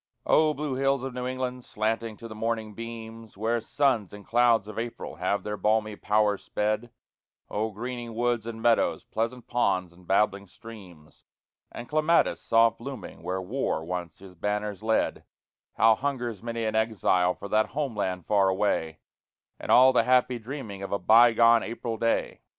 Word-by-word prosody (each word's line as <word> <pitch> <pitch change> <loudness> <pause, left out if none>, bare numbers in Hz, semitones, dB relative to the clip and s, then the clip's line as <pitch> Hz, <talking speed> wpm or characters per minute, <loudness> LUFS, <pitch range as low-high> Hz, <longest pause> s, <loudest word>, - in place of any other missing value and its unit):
Oh, 155 -1 +4
blue 145 -1 -3
hills 135 0 +1
of 135 -1 -4
New 125 0 -4
England, 125 -1 -4
slanting 110 0 -2
to 115 - -9
the 110 - -8
morning 110 -1 -3
beams 115 -1 -9
Where 115 +3 0
suns 125 -8 0
and 105 0 -11
clouds 120 -3 +3
of 110 - -6
April 115 -8 -6
have 95 +4 -1
their 105 0 -4
balmy 105 +1 +1
power 105 -1 +1
sped; 110 +3 -2 0.6
Oh, 110 +2 -1
greening 120 +1 -6
woods 120 -1 0
and 115 -1 -6
meadows, 120 -1 +2
pleasant 115 +2 -3
ponds 95 -7 0
and 90 0 -20
babbling 100 0 +1
streams, 90 -8 -14 0.5
And 120 - -8
clematis 155 +2 +2
soft 115 0 +3
blooming 125 -5 -8
where 95 +1 -3
War 95 -6 -2
once 90 -2 -5
his 95 -1 -13
banners 105 +2 -3
led; 110 0 0 0.5
How 115 0 +5
hungers 120 -4 -3
many 115 0 -4
an 110 - -1
exile 100 -5 +2
for 100 - -8
that 110 +1 +2
homeland 105 - -3
far 100 -2 +3
away, 95 -5 -1 0.6
And - - -3
all 130 +1 +7
the - - +5
happy 125 0 +3
dreaming 115 -5 -7
of 100 - -6
a 100 - +1
bygone 115 +3 +6
April 115 0 -4
day! 115 +1 -1
110 Hz, 165 wpm, -27 LUFS, 105-120 Hz, 0.6 s, all